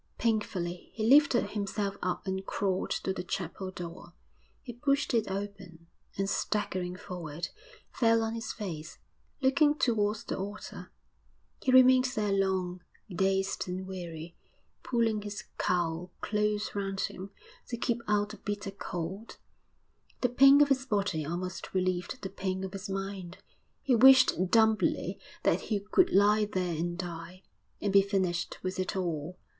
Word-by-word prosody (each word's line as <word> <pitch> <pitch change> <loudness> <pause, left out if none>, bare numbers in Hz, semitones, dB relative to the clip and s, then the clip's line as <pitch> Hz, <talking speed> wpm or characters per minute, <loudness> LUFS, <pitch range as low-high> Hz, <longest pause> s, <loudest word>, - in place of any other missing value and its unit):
Painfully 190 -6 -1
he 220 -1 0
lifted 280 -1 +5
himself 200 -1 -2
up 180 +3 -2
and 190 0 -2
crawled 190 -2 -1
to 190 - -1
the 190 - -4
chapel 185 +1 -4
door; 175 -1 -8 0.5
he 240 - -7
pushed 275 +3 0
it 225 -3 +1
open, 190 -4 -6 0.3
and, 195 0 0
staggering 185 -3 -1
forward, 175 -4 -6 0.4
fell 230 -1 +3
on 225 0 -2
his 225 -1 -4
face, 170 -7 -6 0.5
looking 290 +3 +4
towards 215 -5 +1
the - - -3
altar. 205 +2 -7 0.7
He 260 - +1
remained 255 0 +7
there 210 -2 0
long, 190 -2 0 0.3
dazed 195 +1 0
and 185 +1 -4
weary, 170 -3 -7 0.5
pulling 230 -4 +1
his 205 -1 -6 0.2
cowl 175 0 0
close 210 0 -1
round 195 -1 -2
him 190 +2 -4 0.4
to 240 - -4
keep 235 0 -1
out 205 0 +2
the 215 - -9
bitter 205 -1 -4
cold. 190 +2 -6 0.8
The 250 - +3
pain 275 +3 +7
of 285 - -1
his 265 -1 +1
body 200 -8 0
almost 175 +5 -5
relieved 185 +5 -1
the 190 - -3
pain 190 -1 -3
of 190 0 -5
his 195 0 -6
mind; 195 -2 -5 0.5
he 270 - +2
wished 255 -6 +6
dumbly 220 0 +2 0.2
that - - +2
he 210 -3 +1
could 215 - +3
lie 210 +2 +5
there 185 -4 -2
and 175 +2 -2
die, 175 +1 -7 0.4
and 200 -1 -1
be 200 - +8
finished 190 -3 -1
with 185 0 -3
it 185 - -2
all. 175 -2 -3
195 Hz, 150 wpm, -30 LUFS, 180-220 Hz, 0.8 s, be